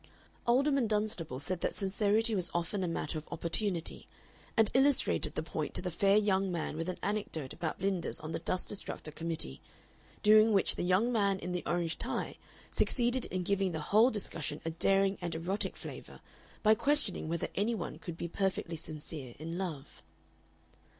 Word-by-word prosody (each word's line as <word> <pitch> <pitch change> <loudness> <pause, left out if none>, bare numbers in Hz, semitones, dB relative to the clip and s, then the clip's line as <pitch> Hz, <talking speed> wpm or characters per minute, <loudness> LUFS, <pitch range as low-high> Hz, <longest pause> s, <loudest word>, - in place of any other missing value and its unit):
Alderman 270 +1 +3
Dunstable 210 - -1
said 175 +4 -3
that - - 0
sincerity 210 +3 +2
was 185 -3 +3
often 175 +3 -1
a - - 0
matter 160 -2 -2
of 155 - -15
opportunity, 170 +1 0 0.5
and 225 -2 +5
illustrated 270 +1 +3
the 155 - -1
point 155 -1 -4
to - - +2
the 180 - -2
fair 195 +4 +4
young 195 -2 +2
man 165 -3 -2
with 165 +3 -3
an 185 - -3
anecdote 195 -9 -2
about 160 -2 -3
Blinders 190 -2 -1
on 155 +1 -6
the - - -2
Dust 180 +2 0
Destructor 190 -5 -4
Committee, 160 - -3 0.6
during 215 +1 +7
which 195 - +4
the - - -3
young 185 +7 +3
man 200 -4 +2
in 180 - -5
the 180 0 -1
orange 170 -2 0
tie - - -3 0.3
succeeded 245 0 +2
in 185 -1 -3
giving 195 -1 +1
the 160 - -2
whole 225 +4 +7
discussion 165 - -3
a 165 - -1
daring 195 +3 +2
and 170 -2 -2
erotic 180 +5 -2
flavor - - -9 0.4
by 215 0 +7
questioning 285 - +1
whether 170 0 -1
any 220 +4 +1
one 180 - -5
could 170 -2 -7
be 170 - -3
perfectly 180 -2 -1
sincere 150 -5 -7
in 165 +3 -5
love. 165 -7 -5
185 Hz, 175 wpm, -32 LUFS, 165-210 Hz, 0.6 s, during